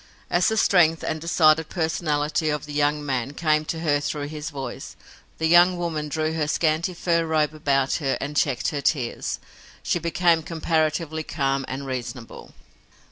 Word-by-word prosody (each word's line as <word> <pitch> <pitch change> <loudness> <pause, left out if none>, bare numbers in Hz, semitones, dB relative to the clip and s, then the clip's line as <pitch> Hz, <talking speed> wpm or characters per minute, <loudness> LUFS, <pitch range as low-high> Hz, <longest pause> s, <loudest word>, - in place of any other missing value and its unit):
As 175 0 +3
the 220 - +1
strength 165 -6 +4
and 155 - -3
decided 160 -1 +3
personality 155 -2 -1
of 150 0 -2
the 150 - -8
young 145 0 +1
man 130 -1 -2
came 155 -2 +1
to 160 +1 -4
her 145 -3 +2
through 145 0 -3
his 155 +1 -5
voice, 140 -4 -7 0.4
the 160 - -1
young 175 +2 +6
woman 160 -3 -3
drew 155 +2 -1
her 155 -2 -1
scanty 160 +3 0
fur 170 -1 +1
robe 155 -2 +1
about 140 -3 +1
her 135 -2 0
and 145 +1 -5
checked 140 -4 +1
her 145 -4 -3
tears. 130 -5 -1 0.4
She 175 - 0
became 170 0 +2
comparatively 160 -1 -1
calm 135 -3 -1
and 135 +2 -5
reasonable. 125 -2 -6
155 Hz, 165 wpm, -24 LUFS, 145-165 Hz, 0.4 s, young